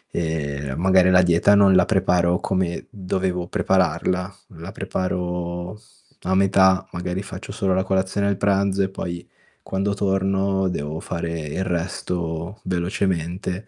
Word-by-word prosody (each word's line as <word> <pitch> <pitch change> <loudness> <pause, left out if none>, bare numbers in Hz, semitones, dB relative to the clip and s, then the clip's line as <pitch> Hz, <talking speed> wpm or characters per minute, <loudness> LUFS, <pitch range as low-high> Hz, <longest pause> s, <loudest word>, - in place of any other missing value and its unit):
e 70 -4 -2
magari 95 +1 +4
la 90 0 +6
dieta 85 +4 +4
non 100 -2 +6
la 90 - +6
preparo 90 -3 +2
come 90 -3 -2
dovevo 90 -2 -2
prepararla, 90 +1 0 0.2
la 85 +4 -8
preparo 90 -1 -3 0.5
a 95 +1 +1
metà, 95 -1 +4
magari 90 +1 -3
faccio 95 0 -8
solo 95 -4 0
la 95 +1 +1
colazione 95 +1 0
e - - +2
il 100 - -2
pranzo, 100 0 +1
e - - +1
poi 85 -2 -6 0.3
quando 100 +1 -1
torno 95 -1 +1
devo 75 -1 -4
fare 85 -1 -4
il 95 +6 -3
resto 85 0 -3
velocemente. 90 +1 -2
95 Hz, 135 wpm, -22 LUFS, 85-95 Hz, 0.5 s, la